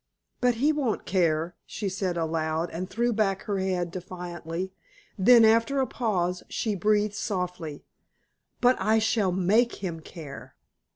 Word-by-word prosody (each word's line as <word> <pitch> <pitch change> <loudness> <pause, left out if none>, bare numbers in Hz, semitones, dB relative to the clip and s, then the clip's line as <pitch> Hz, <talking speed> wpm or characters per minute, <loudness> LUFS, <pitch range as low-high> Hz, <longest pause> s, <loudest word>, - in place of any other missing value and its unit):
"But 245 -1 +3
he 290 +7 +2
won't 270 -7 -1
care," 170 -2 +1
she 210 - -5
said 185 -2 -2
aloud, 160 0 -1
and 180 +3 -4
threw 235 +3 0
back 195 -3 0
her 200 -3 -2
head 180 -2 -1
defiantly: 180 0 -6 0.4
then 230 +4 +7
after 230 +5 +3
a 265 - +3
pause, 180 -8 -1
she 220 - -1
breathed 210 +2 +2
softly, 180 -7 -4 0.8
"But 250 +1 +5
I 215 +3 +3
shall 220 -3 +2
make 200 +7 +2
him 170 -4 -5
care." 155 -3 -10
190 Hz, 140 wpm, -27 LUFS, 175-220 Hz, 0.8 s, then